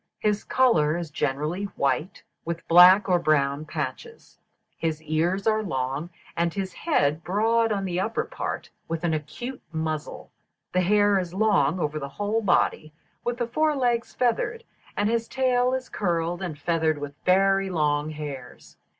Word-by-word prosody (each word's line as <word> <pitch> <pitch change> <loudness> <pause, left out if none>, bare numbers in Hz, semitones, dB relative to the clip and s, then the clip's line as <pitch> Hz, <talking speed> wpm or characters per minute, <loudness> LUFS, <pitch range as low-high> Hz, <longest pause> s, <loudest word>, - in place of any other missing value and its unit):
His 210 -1 0
colour 170 -12 +3
is 170 -3 -5
generally 150 +8 -2
white, 155 +6 -1 0.2
with 170 0 -5
black 180 +4 +8
or 180 -2 +3
brown 150 -2 +1
patches; 460 - -6 0.4
his 160 -2 -2
ears 170 +5 0
are 220 -1 +2
long, 140 -3 -3 0.3
and 170 0 +1
his 190 0 -4
head 155 - 0
broad 225 +5 +2
on 200 -2 -1
the 180 -1 -2
upper 220 +4 -1
part, - - -5 0.2
with 165 +1 -4
an 170 -2 +1
acute 240 - -5
muzzle; 155 -2 -4 0.4
the 185 - +3
hair 205 +1 +3
is 180 -1 -5
long 190 -6 +2
over 155 -1 -2
the 140 -1 -5
whole 205 +8 -1
body, 175 -5 +1 0.3
with 240 0 -2
the 240 - -1
fore 305 +5 +1
legs 240 -3 0
feathered; 250 - 0 0.3
his 225 +2 +1
tail 255 -1 +1
is 260 0 -4
curled, 175 -2 -1
and 170 -6 -4
feathered 160 0 0
with 145 -1 -6
very 195 +1 +3
long 150 -3 0
hairs. 145 -5 -8
180 Hz, 155 wpm, -25 LUFS, 155-215 Hz, 0.4 s, black